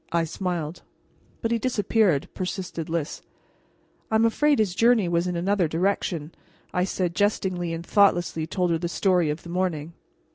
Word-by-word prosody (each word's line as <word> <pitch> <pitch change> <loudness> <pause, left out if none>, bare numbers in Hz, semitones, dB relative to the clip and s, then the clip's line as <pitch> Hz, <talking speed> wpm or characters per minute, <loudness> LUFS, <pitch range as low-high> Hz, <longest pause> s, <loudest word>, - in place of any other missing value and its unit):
I 170 0 +2
smiled. 170 -1 -3 0.6
"But 225 - 0
he 235 - +2
disappeared," 210 - +1
persisted 180 -3 -4
Lys. 165 -1 -3 0.9
"I'm 220 +1 +3
afraid 290 +5 +3
his 210 -5 +1
journey 230 -1 +4
was 170 +1 +1
in 180 - -2
another 185 +1 +1
direction," 170 -2 -1 0.4
I 180 0 +2
said 180 -2 -1
jestingly, 185 -3 0
and 165 +1 -5
thoughtlessly 175 -6 +2
told 180 +1 0
her 165 - +1
the 170 0 -2
story 180 -3 +2
of 150 +2 -3
the 170 - -10
morning. 170 -3 -2
180 Hz, 155 wpm, -25 LUFS, 170-200 Hz, 0.9 s, journey